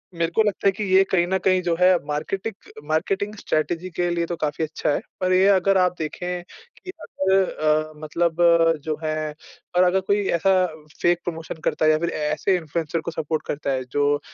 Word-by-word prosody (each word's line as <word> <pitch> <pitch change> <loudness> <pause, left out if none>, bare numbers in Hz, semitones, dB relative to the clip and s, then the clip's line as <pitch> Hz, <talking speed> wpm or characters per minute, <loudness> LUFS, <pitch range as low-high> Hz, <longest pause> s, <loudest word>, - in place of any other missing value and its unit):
मेरे 170 0 -1
को 220 - +5
लगता 205 -1 0
है - - +6
कि 205 +2 -5
ये 190 - +7
कहीं 175 -2 +3
न 190 +1 +1
कहीं 185 -1 +4
जो 175 -2 0
है 180 0 +6
मार्केटिक 190 +8 -3 0.3
मार्केटिंग 195 +6 0
स्ट्रैटेजी 175 -1 -2
के 175 0 0
लिए 170 -1 0
तो 175 - -4
काफ़ी 150 +1 -1
अच्छा 155 -1 -2
है। 145 - +1 0.2
पर 185 0 +2
ये 185 +1 +5
अगर 195 0 +4
आप 180 -1 +2
देखें 180 +3 -4 0.3
कि - - -13
अगर 190 0 +1
अ, 155 0 0
मतलब 170 +2 0 0.5
जो 155 -1 -2
है 155 -1 -2 0.4
और 180 - +6
अगर 180 +1 +3
कोई 200 +2 +1
ऐसा 190 +3 +3 0.5
फेक 175 0 +3
प्रमोशन 165 -1 -5
करता - - 0
है 155 - +6
या 155 - +3
फिर 170 +1 -1
ऐसे 155 +5 0
इन्फ्लुएंसर 160 0 -3
को 170 - -5
सपोर्ट 155 -1 -3
करता 145 -1 -2
है 130 -1 -1
जो, 145 +3 +1
170 Hz, 200 wpm, -23 LUFS, 155-185 Hz, 0.5 s, ये